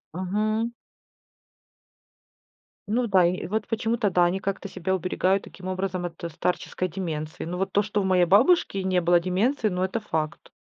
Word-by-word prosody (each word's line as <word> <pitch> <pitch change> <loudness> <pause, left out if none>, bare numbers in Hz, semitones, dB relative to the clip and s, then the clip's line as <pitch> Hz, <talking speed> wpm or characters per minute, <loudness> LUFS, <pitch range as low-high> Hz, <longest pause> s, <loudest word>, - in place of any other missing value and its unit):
Мгм. 215 +5 -1 2.2
Ну 235 +3 +1
да, 190 -3 +5
и 175 0 -1
вот 210 +2 -2
почему-то 225 -2 0
да, 175 0 +4
они 180 +2 0
как-то 195 +1 -3
себя 190 0 -2
уберегают 185 +2 +1
таким 185 - -12
образом 185 -1 -2
от 170 -1 -8
старческой 180 +2 -2
деменции. 155 -3 -5
Но 180 +2 -4
вот 195 +1 -1
то, 205 - +3
что 210 0 -1
у - - -1
моей 185 -2 +4
бабушки 215 - +4
не 185 -2 +1
было 175 0 +4
деменции, 210 +7 +1
ну 180 -1 -2
это 190 +5 -1
факт, 160 -7 -4
190 Hz, 165 wpm, -25 LUFS, 180-210 Hz, 2.2 s, да